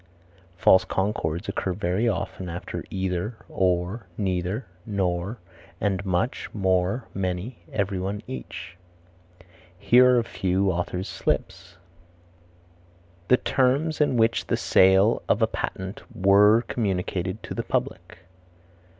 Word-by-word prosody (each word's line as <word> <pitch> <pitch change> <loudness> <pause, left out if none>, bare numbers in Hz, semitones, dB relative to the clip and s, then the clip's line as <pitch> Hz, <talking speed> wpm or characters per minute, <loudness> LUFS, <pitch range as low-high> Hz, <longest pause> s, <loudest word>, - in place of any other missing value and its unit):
False 95 +1 +6
concords 95 -2 -2
occur 95 - -2
very 95 +5 0
often 90 -2 -4
after 85 +1 -5
either, 95 +4 -2
or, 95 +3 0
neither, 95 +3 -1 0.2
nor, 95 0 -2 0.4
and 100 -2 0
much, 95 +4 -1
more, 95 +3 +1
many, 95 +4 -3
everyone, 100 0 -2
each. 65 +6 -8 1.0
Here 125 +6 +5
are - - +4
a 120 - +3
few 95 -2 0
authors' 90 +1 -3
slips: 85 +1 -3 1.5
"The 125 - +5
terms 140 +6 +1
in 140 -4 +2
which 115 0 +2
the - - +1
sale 95 +4 +4
of - - +3
a - - +7
patent 95 +2 -5
were 105 +4 +5
communicated 95 -2 -2
to - - -6
the - - -2
public." - - -3
95 Hz, 115 wpm, -25 LUFS, 90-110 Hz, 1.5 s, a